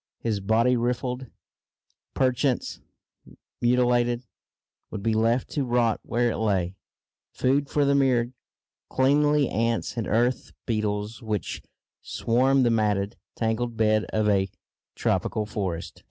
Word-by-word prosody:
His 110 -3 -2
body, 115 +5 +2
rifled, 125 +2 -2 0.9
perchance 130 0 0 0.8
mutilated, 120 0 +2 0.7
would 105 -2 -6
be 115 0 +1
left 115 +3 +2
to 145 - -1
rot 120 -3 +1
where 120 0 0
it - - -3
lay 95 -4 0 0.6
food 140 +2 +1
for 145 -1 +2
the 140 - +3
myriad 130 -3 +2 0.6
cleanly 145 +1 +3
ants 115 +2 -1
and 115 - -2
earth 120 +4 0
beetles 105 0 -2
which 110 -3 -3 0.4
swarm 130 +3 +2
the 120 - +3
matted, 105 -2 +1 0.2
tangled 115 +1 -1
bed 110 -1 +2
of 110 -1 0
a 95 -2 +2 0.5
tropical 110 - 0
forest. 95 -5 -4
115 Hz, 120 wpm, -26 LUFS, 110-125 Hz, 0.9 s, the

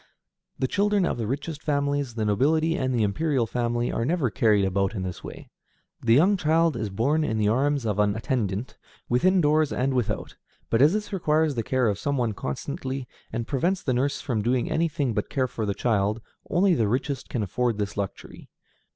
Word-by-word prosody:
The 130 - 0
children 205 +3 +2
of 120 - -2
the 110 - -2
richest 145 +4 -4
families, 140 -4 -1
the 110 -2 -1
nobility, 155 +10 +2
and 130 -4 -1
the 120 -3 +1
imperial 130 +4 +1
family, 120 +1 -1
are 115 - -1
never 145 -3 0
carried 105 -3 +3
about 95 +2 0
in 95 - -3
this 90 -1 -6
way. - - -9 0.5
The 115 0 +4
young 190 +9 +4
child 165 -2 +2
is 110 -3 -3
borne 140 +11 +1
in 110 -7 -1
the 105 -1 +2
arms 140 +3 +1
of 105 -2 -1
an 105 -1 +2
attendant, 110 -1 -2 0.3
within 180 +10 +3
doors 155 0 +3
and 130 +2 0
without; 115 -4 -2 0.3
but 115 - +3
as 150 +5 +6
this 210 -1 -3
requires 155 -4 +2
the 120 - -1
care 130 +2 +1
of 100 -2 -1
some 140 -1 -1
one 120 -3 0
constantly, 130 - -4 0.2
and 115 - -3
prevents 175 +9 0
the 130 - 0
nurse 135 +3 0
from 120 -7 -1
doing 120 +5 0
anything 155 -5 0
but - - -2
care 130 -3 0
for 110 -3 -4
the 100 - -1
child, 105 -1 +1 0.3
only 190 +1 +3
the 115 -9 +2
richest 130 +4 -2
can 120 -5 -1
afford 115 +3 -1
this 105 -1 -3
luxury. 100 -2 -6
130 Hz, 200 wpm, -25 LUFS, 110-150 Hz, 0.5 s, as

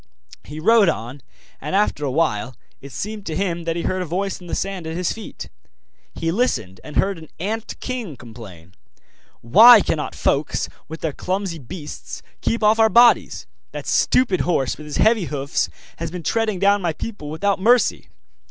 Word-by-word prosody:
He 150 +1 -8
rode 215 +2 +5
on, 125 +1 -4 0.4
and 150 +7 -3
after 200 -7 +1
a 140 - 0
while 130 -5 0 0.3
it 140 - -11
seemed 210 +5 -5
to 160 - -3
him 175 -3 -2
that 165 -1 -1
he 170 - -3
heard 185 0 -1
a - - -2
voice 190 +4 -3
in 175 - -11
the - - -3
sand 190 -4 -3
at 160 +1 -4
his 180 -1 0
feet. 220 - -9 0.7
He 165 - -1
listened, 170 - -1
and 150 - -10
heard 195 -3 +1
an 160 - -13
ant 220 +5 -4
king 240 - -5
complain: 105 -8 -12 0.7
'Why 220 - +9
cannot 155 -6 -2
folks, 145 +2 0 0.2
with 160 +1 -8
their 160 -3 -2
clumsy 185 -1 -3
beasts, 145 +4 -8 0.2
keep 230 -1 -1
off 215 +1 +4
our 220 0 +6
bodies? 235 +1 +4 0.3
That - - -6
stupid 220 -8 +2
horse, 150 -7 0
with 150 - -11
his 150 - -4
heavy 220 -4 +3
hoofs, 140 -2 -2 0.3
has 165 -1 -4
been 175 0 -7
treading 225 -1 0
down 200 +2 +3
my 170 -3 -1
people 160 -4 -7
without 195 +6 0
mercy! 240 +4 +3
175 Hz, 180 wpm, -21 LUFS, 150-210 Hz, 0.7 s, Why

